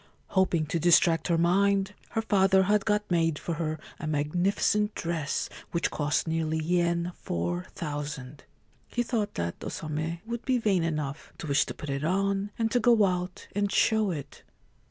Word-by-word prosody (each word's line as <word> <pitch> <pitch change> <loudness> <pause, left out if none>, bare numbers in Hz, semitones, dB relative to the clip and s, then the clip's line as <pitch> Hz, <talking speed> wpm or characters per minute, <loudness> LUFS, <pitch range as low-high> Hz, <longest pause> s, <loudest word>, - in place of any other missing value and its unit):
Hoping 185 -5 +2
to 155 +2 -1
distract 165 0 +4
her 170 -2 +2
mind, 195 +3 +2 0.2
her 225 -1 0
father 195 -3 +4
had 205 +1 +2
got 210 -1 +2
made 165 -3 +2
for 170 - -3
her 155 -1 -2 0.2
a 155 - -4
magnificent 180 +8 +1
dress 165 -3 -2 0.2
which 170 - -1
cost 150 +2 0
nearly 160 -1 0
yen 170 +1 +1
4000. 135 - -4 0.4
He 240 - -1
thought 220 -3 -2
that 85 0 -2
O - - -4
Same 160 +2 -3
would 235 +1 -4
be 260 -1 +2
vain 205 -6 +2
enough 150 -3 -3
to - - -7
wish 140 -2 +2
to - - -6
put 150 - -6
it 140 +1 -2
on, 195 +4 0
and 225 -1 0
to 245 - +3
go 230 -2 +5
out 180 -1 -3
and 205 -1 +1
show 220 -2 +3
it. 150 -6 -6
170 Hz, 170 wpm, -28 LUFS, 155-200 Hz, 0.4 s, go